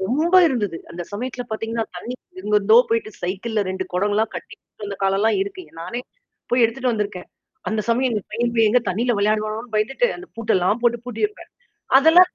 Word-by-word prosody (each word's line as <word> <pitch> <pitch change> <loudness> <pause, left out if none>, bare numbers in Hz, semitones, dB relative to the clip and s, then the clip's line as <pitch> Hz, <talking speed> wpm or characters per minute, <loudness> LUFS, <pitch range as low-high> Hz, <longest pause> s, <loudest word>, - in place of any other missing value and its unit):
ரொம்ப 300 - +2
இருந்தது. 210 - -1
அந்த 175 - -5
சமயத்துல 245 +4 -4
பார்த்தீங்கன்னா, 225 +1 -2
தண்ணீக்கு 255 - -8
எங்கருந்தோ 210 - +4
போயிட்டு 230 -1 0
சைக்கிள்ல 205 +5 -2
2 190 0 -2
குடங்கள்லாம் 205 +4 +1
கட்டி - - -7 0.3
வந்த 200 -1 -4
காலம்லாம் 195 +3 +2
இருக்கு. 385 -2 -7 0.2
நானே 185 +9 -4 0.5
போய் 245 0 +4
எடுத்துட்டு 245 +2 0
வந்தருக்கேன். 205 -4 -3 0.4
அந்த 220 -1 0
சமயம் 250 +2 +2
எந்த 210 - -1
பையன் 235 +2 0 0.2
எங்க 250 +4 +5
போய் 235 - -5
தண்ணீல 235 +6 +1
விளையாடுவானோன்னு 215 +2 -1
பயந்துட்டு 235 - +2
அந்த 365 +2 -10
பூட்டெல்லாம் 215 -1 +1
போட்டு 240 0 +3
பூட்டி 245 - -2
வப்பேன். 420 - -15 0.5
அதெல்லாம் 330 +6 +7
225 Hz, 165 wpm, -22 LUFS, 205-250 Hz, 0.5 s, அதெல்லாம்